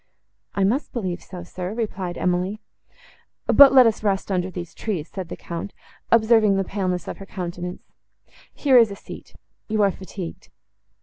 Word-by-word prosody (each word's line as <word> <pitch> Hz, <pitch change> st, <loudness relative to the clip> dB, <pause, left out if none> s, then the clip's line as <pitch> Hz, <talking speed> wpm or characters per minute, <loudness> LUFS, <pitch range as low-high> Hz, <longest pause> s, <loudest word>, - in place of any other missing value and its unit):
—"I 200 Hz, -, +1 dB
must 235 Hz, +10 st, 0 dB
believe 185 Hz, -7 st, -3 dB
so, 180 Hz, -2 st, -9 dB
sir," 180 Hz, +3 st, -6 dB
replied 190 Hz, -6 st, -3 dB
Emily. 180 Hz, +3 st, 0 dB, 0.9 s
"But 280 Hz, -1 st, +8 dB
let 260 Hz, -2 st, +8 dB
us 225 Hz, -2 st, +1 dB
rest 200 Hz, -1 st, 0 dB
under 185 Hz, -1 st, 0 dB
these 175 Hz, -2 st, -7 dB
trees," 180 Hz, -8 st, -3 dB
said 185 Hz, -3 st, -7 dB
the -, -, -6 dB
Count, 170 Hz, +4 st, -6 dB, 0.4 s
observing 220 Hz, -3 st, +5 dB
the 195 Hz, -, +1 dB
paleness 185 Hz, -3 st, -2 dB
of -, -, -5 dB
her 195 Hz, -, -8 dB
countenance; 180 Hz, -1 st, -6 dB, 0.7 s
"here 265 Hz, -4 st, +5 dB
is 230 Hz, -2 st, +5 dB
a 200 Hz, -, -6 dB
seat—you 215 Hz, +2 st, -8 dB
are 200 Hz, -, +4 dB
fatigued." 190 Hz, -2 st, -8 dB
195 Hz, 160 wpm, -23 LUFS, 180-215 Hz, 0.9 s, But